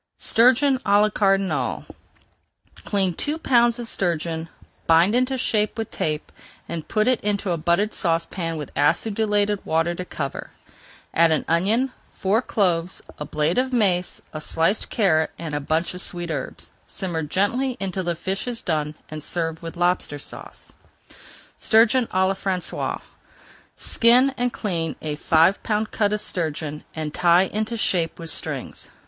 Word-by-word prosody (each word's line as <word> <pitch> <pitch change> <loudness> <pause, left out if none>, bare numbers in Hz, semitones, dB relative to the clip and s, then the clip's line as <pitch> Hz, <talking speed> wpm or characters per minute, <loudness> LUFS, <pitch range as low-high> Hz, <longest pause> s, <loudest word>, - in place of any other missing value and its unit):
STURGEON 260 +3 +4
À 205 0 +4
LA 210 +1 +4
CARDINAL 195 - +1 1.0
Clean 195 -3 +1
two 295 - -2
pounds 240 -5 +3
of 240 -1 -6
sturgeon, 165 -4 -2 0.4
bind 165 +5 +5
into 255 +2 +1
shape 215 -3 0
with 225 -1 -4
tape, 155 -1 -3 0.4
and 165 -2 -5
put 215 +1 +1
it 255 -2 +2
into 200 -2 -1
a 170 - 0
buttered 175 +7 +1
saucepan 165 0 -1
with 150 - -6
acidulated 205 +6 +1
water 165 +2 +1
to 180 - -5
cover. 140 -6 -5 0.6
Add 165 0 +4
an 155 - +1
onion, 210 +11 +2 0.2
four 205 +4 +1
cloves, 180 -6 0 0.2
a 150 - -4
blade 155 +9 0
of 260 +1 0
mace, 190 -7 0
a 155 - -5
sliced 165 +7 +1
carrot, 160 -8 +2
and 165 -3 -6
a 145 - 0
bunch 160 +5 -1
of 180 - -4
sweet 175 -3 -3
herbs. 140 -4 -6 0.2
Simmer 175 -4 -3
gently 205 - 0
until 190 -1 -2
the 175 -1 0
fish 190 +7 -3
is 240 -2 -3
done 150 -2 -1
and 155 0 -6
serve 165 0 -3
with 165 0 -7
Lobster 175 -4 0
Sauce. 145 - -10 0.9
STURGEON 230 +2 +4
À 190 0 +1
LA 195 - +1
FRANÇAISE 190 -2 -2 0.7
Skin 250 +3 +4
and 245 -1 0
clean 170 -9 -2
a 150 -1 -2
five 165 +5 +3
pound 215 0 -1
cut 205 -2 +1
of 210 - 0
sturgeon, 155 -5 -3
and 155 -1 -4
tie 175 0 +4
into 215 +4 -2
shape 170 -6 0
with 165 -1 -4
strings. - - -4
185 Hz, 155 wpm, -23 LUFS, 165-215 Hz, 1.0 s, bind